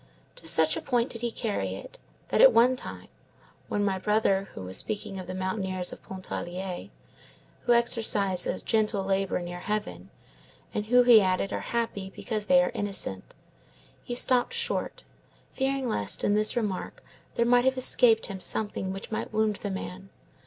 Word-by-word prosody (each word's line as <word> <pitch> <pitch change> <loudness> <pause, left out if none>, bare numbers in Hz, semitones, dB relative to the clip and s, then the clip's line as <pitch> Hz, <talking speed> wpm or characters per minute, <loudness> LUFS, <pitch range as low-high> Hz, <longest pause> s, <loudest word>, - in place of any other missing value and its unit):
To 165 - -9
such 160 -1 +5
a - - -4
point 245 -1 0
did 230 - -5
he 240 - -1
carry 225 -2 -3
it, - - -11 0.3
that - - +2
at - - +9
one 245 +3 +4
time, - - -9 0.6
when 205 0 -1
my 190 -1 -1
brother 195 -1 +1
was 95 0 -2
speaking 205 -2 -2
of 185 - -8
the 185 - -5
mountaineers 185 -1 -2
of - - -12
Pontarlier, 185 -1 -6 0.8
who 240 - +4
exercise 225 -5 +3
a - - -2
gentle 215 -3 +1
labor 195 0 0
near 175 0 -6
heaven, 100 - -4 0.6
and 210 0 -3
who, 245 +2 +5
he 240 -3 +7
added, 185 0 0
are - - -2
happy 215 -5 -3
because 215 -3 -4
they 270 0 +5
are - - -2
innocent, 195 - -2 0.7
he 240 - -5
stopped 250 - +3
short, 470 0 -2 0.5
fearing 270 -1 -1
lest 105 - -1
in 205 - +2
this 215 +1 +3
remark 210 -5 -3 0.3
there 235 - +2
might 245 +1 +4
have 260 0 +2
escaped 245 -3 +4
him 195 -2 -7
something 205 -3 0
which 195 +3 -8
might 220 - -4
wound 215 -1 0
the 205 - -5
man. 190 0 -7
210 Hz, 170 wpm, -27 LUFS, 190-235 Hz, 0.8 s, at